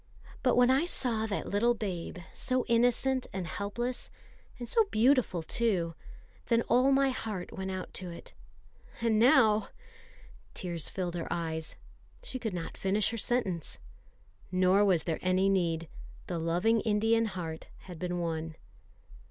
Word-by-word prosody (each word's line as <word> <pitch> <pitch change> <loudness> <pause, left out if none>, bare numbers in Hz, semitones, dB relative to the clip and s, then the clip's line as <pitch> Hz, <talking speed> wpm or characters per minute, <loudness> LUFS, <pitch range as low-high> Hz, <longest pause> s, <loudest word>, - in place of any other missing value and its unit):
But 250 - +3
when 245 +1 +5
I 275 +5 +3
saw 230 -10 -1
that 205 - -3
little 235 +4 +2
babe, 185 -6 -4 0.2
so 255 -1 0
innocent 245 +2 +2
and 190 -2 -4
helpless, 205 +8 -4 0.5
and 240 - -6
so 450 - +3
beautiful 240 - +2
too, 180 -4 0 0.5
then 230 -1 +3
all 255 +4 +3
my 275 0 +4
heart 215 -7 -5
went 190 0 -4
out 185 -1 -5
to 180 - -6
it. 170 - -10 0.7
And 225 -2 +2
now 220 -3 +5 0.4
" - - -23
Tears 170 -4 -2
filled 180 -2 -3
her 170 -2 -4
eyes. 160 -2 -3 0.5
She 260 - -6
could 225 -3 -3
not 165 -2 -5
finish 200 +3 +1
her 230 - -4
sentence. 195 - -1 0.7
Nor 185 +2 +4
was 180 -5 +3
there 165 -2 -2
any 185 +1 +2
need; 170 -4 0 0.4
the 175 -2 -3
loving 180 +8 +2
Indian 225 +1 +2
heart 170 -6 -5
had 180 -4 -10
been 180 -1 -2
won. 165 -2 -3
200 Hz, 150 wpm, -30 LUFS, 175-235 Hz, 0.7 s, when